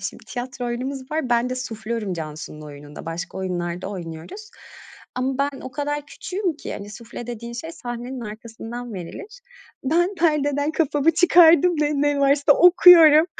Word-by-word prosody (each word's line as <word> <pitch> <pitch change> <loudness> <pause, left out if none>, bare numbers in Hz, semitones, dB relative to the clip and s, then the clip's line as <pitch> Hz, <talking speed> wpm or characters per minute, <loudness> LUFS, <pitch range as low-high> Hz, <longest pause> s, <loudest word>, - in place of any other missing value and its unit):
Şimdi 195 - -7
tiyatro 245 +2 -5
oyunumuz 260 +3 -5
var. 305 -5 -2
Ben 240 +1 +2
de 255 - -1
suflörüm 225 -4 -4
Cansu'nun 155 -1 -7
oyununda, 145 +1 -11
başka 165 +3 -5
oyunlarda 180 -1 -3
oynuyoruz 180 - -8 0.7
ama 260 +1 -1
ben 280 -1 -1
o 260 - -8
kadar 290 +1 -3
küçüğüm 365 0 -4
ki - - -7
hani, 200 +1 -8
sufle 230 +2 -9
dediğin 235 0 -6
şey 320 +8 -7
sahnenin 245 -1 -6
arkasından 225 +2 -8
verilir. 395 - -9 0.4
Ben 345 +7 +1
perdeden 300 -4 +1
kafamı 300 -1 +2
çıkardım 340 0 +6
ve 295 0 +1
ne 290 0 +1
varsa 280 +1 +4
okuyorum. 335 -2 +8
255 Hz, 150 wpm, -22 LUFS, 215-300 Hz, 0.7 s, okuyorum